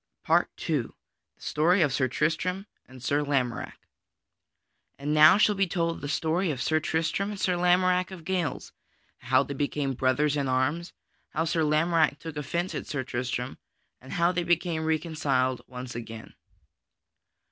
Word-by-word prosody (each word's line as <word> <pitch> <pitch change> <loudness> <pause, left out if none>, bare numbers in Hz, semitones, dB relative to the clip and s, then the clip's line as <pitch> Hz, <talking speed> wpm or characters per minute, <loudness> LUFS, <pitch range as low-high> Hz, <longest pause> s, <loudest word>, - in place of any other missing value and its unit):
PART - - +3 0.2
II - - +2 0.5
The - - -31
Story 170 +4 +3
of 140 -4 +1
Sir 130 -1 +2
Tristram 165 +8 -1 0.2
and 130 -1 -13
Sir 145 +3 +1
Lamorack 135 -5 -1 1.2
And 145 +2 -2
now 155 +4 +8
shall 210 0 +4
be 195 -1 +1
told 170 -1 -1
the 145 - -4
story 165 +5 0
of 140 -5 -2
Sir 155 +5 +1
Tristram 165 +5 -1
and 205 -2 -6
Sir 180 -1 +1
Lamorack 180 +1 +3
of 180 -4 -10
Gales, 180 -4 -2 0.5
how 130 +2 +3
they 140 - -6
became 140 0 -1
brothers 135 +3 +1
in 140 -2 -1
arms; 130 +7 0 0.4
how 160 +2 -1
Sir 165 0 0
Lamorack 155 0 +2
took 160 -1 -8
offence 170 +5 -2
at - - -5
Sir 140 -3 -2
Tristram, 125 0 -4 0.4
and 130 - -9
how 170 0 +3
they 175 -1 -1
became 170 -1 0
reconciled 150 -5 0 0.3
again. 115 -1 -8
155 Hz, 155 wpm, -27 LUFS, 135-175 Hz, 1.2 s, now